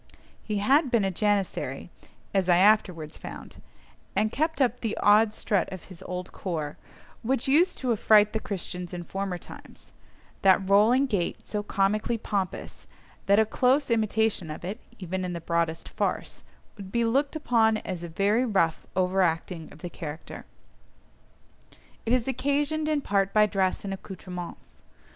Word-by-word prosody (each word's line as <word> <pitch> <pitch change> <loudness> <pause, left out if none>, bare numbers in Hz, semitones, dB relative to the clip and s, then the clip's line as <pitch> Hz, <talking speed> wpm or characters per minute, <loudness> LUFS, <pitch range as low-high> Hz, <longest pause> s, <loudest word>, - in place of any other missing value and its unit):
He 210 -2 -2
had 270 +8 +3
been 235 -4 +2
a 195 - 0
Janissary 205 0 -1 0.4
(as 190 -2 +1
I 175 - +6
afterwards 180 -6 +2
found), - - -10 0.5
and 215 0 +2
kept 315 +5 -1
up 250 -2 +2
the 225 -3 -3
odd 210 +1 +5
strut 205 -2 -1
of 185 -3 -7
his 185 -3 -13
old 180 0 -5
corps, 155 -6 -4 0.5
which 255 +2 -1
used 335 +7 +3
to 255 -2 -1
affright 210 -1 +5
the 220 - 0
Christians 180 -3 -5
in 175 - -5
former 195 0 -3
times—that 190 +2 -3
rolling 220 +7 +5
gait 205 -10 -2
so 210 - -2
comically 210 +3 0
pompous, 200 -4 -4 0.4
that 200 +1 +5
a 220 - +5
close 255 +5 +2
imitation 220 -5 +1
of 155 +3 -7
it, 200 +6 -4 0.2
even 185 -1 -4
in 180 -1 -3
the 170 - -4
broadest 165 -1 -1
farce, - - -3 0.3
would 195 -2 -9
be 235 +1 +1
looked 275 +6 +1
upon 225 -7 +3
as 185 -4 -5
a 170 - -6
very 200 +8 +2
rough 190 -9 +1
over 185 +1 +2
acting 165 -1 -1
of 155 - -15
the 175 - -4
character. 160 -1 -8 1.6
It - - +1
is 250 -1 +1
occasioned 290 +4 0
in 300 -2 +1
part 195 -4 0
by 210 0 +7
dress 195 -1 0
and 195 - -3
accoutrements. 180 -2 -9
200 Hz, 155 wpm, -27 LUFS, 180-230 Hz, 1.6 s, by